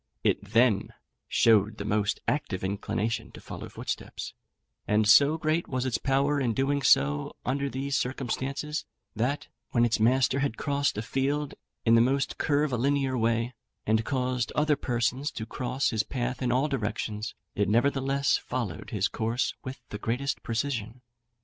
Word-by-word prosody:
It - - +2
then 110 0 +2 0.3
showed 110 -1 +4
the 100 - -5
most 105 0 0
active 105 -11 -1
inclination 105 +3 -2
to - - -10
follow - - -8
footsteps; - - -5 0.5
and 105 0 +3
so 140 +8 +7
great 155 +2 0
was 130 -1 -2
its 130 - 0
power 140 +2 +2
of 120 -5 0
doing 140 +1 +1
so 75 - +3
under 140 +2 0
these 135 +1 -2
circumstances, 135 +4 -2 0.3
that, 125 +7 -1 0.2
when 120 -1 +3
its 120 0 +1
master 130 +4 +3
had 135 -5 -1
crossed 140 -5 0
a 105 - -2
field 140 +4 -1 0.3
in 115 - +5
the 115 - +7
most 135 +3 +1
curvilinear 140 -2 +1
way, 115 +1 +1 0.3
and 110 +1 +2
caused 125 -2 -1
other 150 0 +3
persons 125 +2 -1
to 110 - -5
cross 125 +3 -1
his 110 -3 +2
path 125 +1 -3
in 125 -1 +1
all 130 +4 +2
directions, 110 -4 -3 0.2
it 100 -1 0
nevertheless 135 +4 +2
followed 115 -10 -4
his 105 -4 +1
course 115 +3 -1
with 130 -1 -7
the 105 - -6
greatest 125 +5 -1
precision. 120 -1 -3
125 Hz, 155 wpm, -28 LUFS, 110-140 Hz, 0.5 s, so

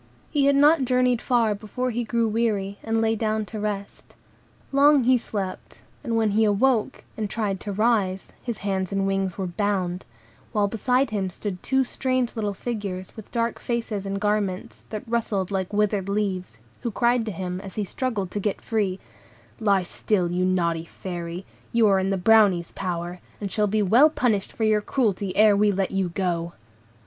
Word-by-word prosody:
He 290 -3 +2
had 280 - +4
not 295 +1 +5
journeyed 250 -1 +2
far 235 -4 +2
before 235 +5 -3
he 240 +1 -1
grew 230 0 +1
weary, 210 -3 -1
and 225 0 0
lay 225 0 +2
down 215 -1 -1
to 215 0 -7
rest. 205 -1 -5 0.6
Long 280 0 +5
he 255 +2 +5
slept, 200 -5 -5 0.2
and 235 -4 -1
when 220 -2 +2
he 220 +2 +3
awoke, 215 +2 +2
and 215 -2 -3
tried 200 -3 -2
to 205 - -5
rise, 200 -3 +1
his 235 -4 -4
hands 190 -2 -1
and 195 0 0
wings 195 -2 -1
were 190 - -2
bound; 185 -1 -1 0.5
while 205 -2 +2
beside 250 +4 +1
him 195 -3 -1
stood 185 0 -5
two 265 0 +2
strange 255 -1 -1
little 210 -3 -2
figures, 200 -5 -5
with 220 - -11
dark 235 -1 -1
faces 225 -4 -3
and 195 0 -2
garments, 210 0 -2
that 215 0 -6
rustled 215 -5 -1
like 190 -1 -2
withered 205 -2 +1
leaves; 190 - -2 0.2
who 240 - -2
cried 235 +3 +2
to - - -1
him, 180 0 -4
as 195 -2 -9
he 210 - -1
struggled 210 -4 -2
to 205 - -2
get 205 0 -1
free,— 200 -4 -1 0.6
"Lie 200 -3 +3
still, 180 -1 0
you 180 +1 0
naughty 170 -3 +1
Fairy, 175 +1 -6 0.3
you 235 -1 +4
are 195 -1 +4
in 190 0 0
the 195 - +1
Brownies' 195 -3 +4
power, 175 -1 -4 0.2
and 200 -2 -4
shall 210 -1 +1
be 210 +1 +1
well 240 +11 +6
punished 225 -9 0
for 225 - -4
your 215 -1 +3
cruelty 205 -6 -1
ere 210 -1 +6
we 205 +1 +3
let 195 -1 -1
you 195 -2 0
go." 170 -2 -2
205 Hz, 185 wpm, -24 LUFS, 190-230 Hz, 0.6 s, well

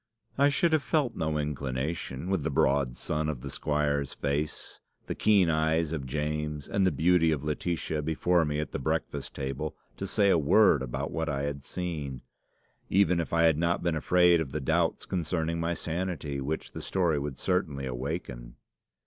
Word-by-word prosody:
"I 140 +1 +4
should 160 +3 +2
have 155 - +4
felt 140 -6 0
no 80 -2 -1
inclination, 70 +1 -3
with 95 -4 +1
the 80 - -1
broad 70 -3 +2
sun 75 +3 -1
of 70 -6 -4
the 70 0 -6
squire's 75 -2 -1
face, 75 +2 -3 0.3
the - - -3
keen 100 -4 +4
eyes 80 0 +1
of 75 -5 -3
James, 75 +1 -3
and 95 -2 +2
the - - +3
beauty 85 0 +3
of 75 -3 -1
Laetitia 75 0 -2
before 80 +3 +2
me 75 -1 -1
at 75 -3 -3
the - - -3
breakfast - - -2
table, 70 +3 -4 0.2
to 95 - -4
say 100 0 +3
a 85 - +4
word 75 0 +5
about 65 -2 -3
what 80 -1 -2
I 70 -1 -1
had 70 -1 -3
seen, 75 -8 -4 0.7
even 95 -2 +3
if 85 - -3
I 85 0 +3
had 80 -2 +4
not 85 +1 +1
been 85 -2 +1
afraid 90 +2 +4
of 70 -5 -4
the 75 - -1
doubt 65 - 0
concerning 85 -2 -1
my 85 +1 0
sanity 80 -5 -3
which 75 +4 -3
the - - -7
story 85 -6 +1
would 70 -2 -4
certainly 75 -8 -1
awaken. 60 -2 -5
80 Hz, 180 wpm, -29 LUFS, 70-85 Hz, 0.7 s, word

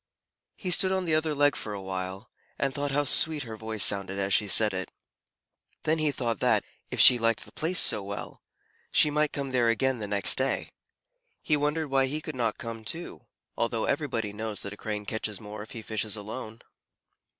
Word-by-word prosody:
He 185 - -4
stood 185 +1 +4
on 190 -1 0
the 165 - 0
other 155 -1 +1
leg 145 0 +3
for 105 -1 -4
a - - -5
while, 95 +2 -5 0.3
and 135 -1 -1
thought 145 +2 -2
how 145 +1 +1
sweet 150 +1 +4
her 115 -3 -7
voice 110 -2 -1
sounded 100 -1 +3
as 100 0 0
she 105 - +3
said 105 +2 +4
it. 95 0 -3 0.9
Then 160 +1 +1
he 155 -1 +1
thought 120 -4 -2
that, - - +2 0.3
if - - -5
she 125 - +9
liked 115 -1 0
the - - -13
place 170 +4 -2
so 105 - +4
well, 100 +1 -7 0.5
she 150 - +4
might 150 0 +1
come 140 -2 -4
there 120 -2 +2
again 125 +2 +1
the 105 - -4
next 100 +3 +2
day. 135 +1 -1 0.7
He 150 - +2
wondered 150 +1 -1
why 135 -1 +3
he 150 +3 -3
could 155 0 -7
not 115 -4 -1
come 115 -1 -7
too, 160 - -3 0.3
although - - -1
everybody 110 -3 -2
knows 110 0 -4
that 100 - -6
a - - -8
Crane 105 -1 -5
catches 110 -1 -4
more 105 0 -8
if 110 - -10
he 115 - -7
fishes 110 -1 -3
alone. 110 +2 -8
115 Hz, 205 wpm, -28 LUFS, 105-145 Hz, 0.9 s, she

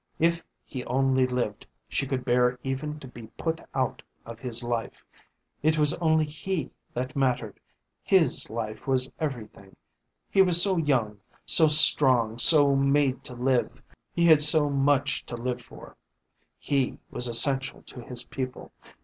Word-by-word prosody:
If 170 +1 0 0.2
he 130 -3 -7
only 130 0 +1
lived 125 -5 -4 0.2
she 135 - -3
could 130 -2 -4
bear 125 0 +1
even 145 +3 -5
to 135 - -10
be 120 -2 -12
put 165 0 -3
out 130 -2 -2 0.2
of 115 0 -10
his 120 -1 -2
life. 120 -1 -5 0.6
It 155 +1 +1
was 150 -1 +2
only 160 -2 +1
he 155 +3 -5 0.2
that 125 +1 -5
mattered, 130 -3 -2 0.4
his 185 -5 +2
life 110 +1 -7
was 130 0 0
everything. 110 -9 -7 0.5
He 195 - +2
was 180 -3 +5
so 190 0 +4
young, 125 -10 -1 0.3
so 160 - +5
strong, 130 -6 +4
so 145 0 +7
made 135 -1 +1
to 125 - -8
live. 125 0 -1 0.3
He 170 - 0
had 160 -3 +5
so 150 -1 +4
much 140 0 0
to 120 - -6
live 125 +1 -4
for. 120 - -15 0.6
He 135 -3 -2
was 125 - -1
essential 135 +3 +2
to 125 - -11
his 120 0 -6
people. 130 -1 -7
135 Hz, 150 wpm, -25 LUFS, 125-150 Hz, 0.6 s, so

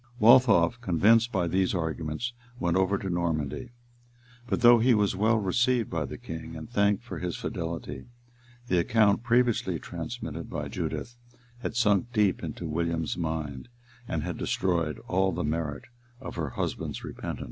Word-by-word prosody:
Waltheof, 115 -3 +6
convinced 115 +4 +4
by 95 -6 0
these 95 +2 +1
arguments, 80 +7 -3 0.3
went 85 0 +1
over 95 +1 +2
to 95 - -5
Normandy; 85 - -2 0.8
but - - -1
though 120 0 +8
he 120 +1 +4
was 105 -3 +2
well 110 +4 +3
received 120 +4 +1
by 80 -3 -1
the - - -7
king, 80 0 -7
and 80 - -7
thanked 100 -2 +1
for 125 - -7
his 90 -1 -3
fidelity, 85 +5 -5 0.6
the 90 -5 +2
account 105 +2 +3
previously 120 -7 +2
transmitted - - -6
by - - -4
Judith 120 +1 -4 0.4
had 120 - -4
sunk 115 0 +2
deep 105 -5 +2
into 85 - -5
William's 80 0 -1
mind, 80 - -4 0.4
and 80 -2 -2
had 90 0 -4
destroyed 85 -5 0
all 95 +1 +2
the - - -2
merit 75 -1 -2 0.4
of 130 - -8
her 80 -4 -2
husband's - - -4
repentance. - - -6
95 Hz, 155 wpm, -28 LUFS, 80-115 Hz, 0.8 s, though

